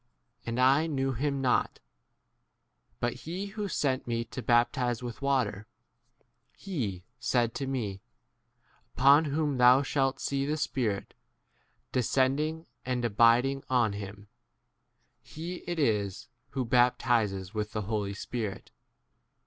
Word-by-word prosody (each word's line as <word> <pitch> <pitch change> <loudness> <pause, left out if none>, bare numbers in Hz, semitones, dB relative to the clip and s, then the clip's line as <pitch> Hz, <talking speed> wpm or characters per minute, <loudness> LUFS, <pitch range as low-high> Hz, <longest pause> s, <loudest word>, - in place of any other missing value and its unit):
And 115 +1 -2
I* 135 +5 +4
knew 135 -3 -1
him 140 +2 -1
not; 125 -2 +1 1.2
but 120 0 0
he 165 +10 -5
who 210 -2 -3
sent 135 -8 -1
me 115 -1 -1
to 130 - -4
baptize 120 0 +1
with 120 +2 -6
water, 115 -7 0 0.9
7te - - -20
w 115 - -3 0.2
said 120 0 +1
to 135 - -4
me, 105 -8 -3 0.9
Upon 140 +4 +6
whom 145 -2 -1
thou 125 +3 +7
shalt 135 -1 0
see 140 -1 -1
the 150 +2 -1
Spirit 115 -9 -2 0.8
descending 140 +6 +1 0.2
and 125 -1 -1
abiding 120 +5 +3
on 120 -5 +2
him, 100 0 -8 0.9
he 170 +3 -7
it 175 -1 -2
is 105 - 0 0.2
who 130 -1 -2
baptizes 115 -6 +2
with 105 -1 -2
34 105 - -3
[the] - - -10
Holy 105 -2 -1
Spirit. 110 -1 -5
125 Hz, 125 wpm, -29 LUFS, 115-140 Hz, 1.2 s, thou